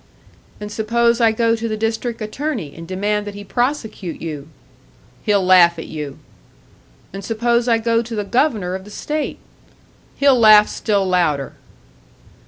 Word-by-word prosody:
"And 210 0 -7
suppose 235 +2 +1
I 225 -1 +5
go 230 +1 +1
to 230 0 -4
the 215 -1 -3
District 225 +2 -2
Attorney 215 - -4
and 165 0 -10
demand 205 +3 -2
that 205 - -7
he 205 - -8
prosecute 220 - -3
you?" 150 -3 -6 0.7
"He'll 200 -3 +1
laugh 175 -2 +6
at 160 - -6
you." 150 -3 -7 1.0
"And 195 0 -7
suppose 235 +3 0
I 230 -1 +4
go 230 0 +1
to 235 0 -6
the 210 - -2
Governor 215 -5 0
of 190 0 -5
the 205 - -13
state?" 300 +8 -4 0.8
"He'll 275 -3 +4
laugh 215 -2 +7
still 205 -3 0
louder." 170 -7 0
215 Hz, 155 wpm, -19 LUFS, 185-235 Hz, 1.0 s, laugh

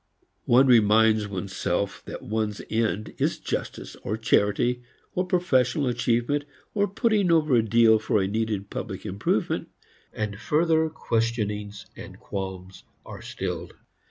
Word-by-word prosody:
One 125 +3 +5
reminds 110 -3 +4
one's 95 -1 -5
self 95 +2 -2
that - - -7
one's 110 -1 -2
end 110 -1 -1
is - - +1
justice - - -5
or 105 - -3
charity 115 +2 +2 0.3
or 180 0 -1
professional 140 -7 +2
achievement 120 +3 0 0.3
or 205 -1 +2
putting 205 -3 +1
over 155 -4 +3
a 120 - +5
deal 110 0 +4
for 105 -1 +1
a 95 - +1
needed 105 -1 -2
public - - -5
improvement, 100 +2 -1 0.4
and 105 -1 -4
further 160 +2 +2
questionings 110 -7 -2
and - - -11
qualms 95 -1 -6 0.2
are - - -9
stilled. - - -5
110 Hz, 130 wpm, -25 LUFS, 105-130 Hz, 0.4 s, One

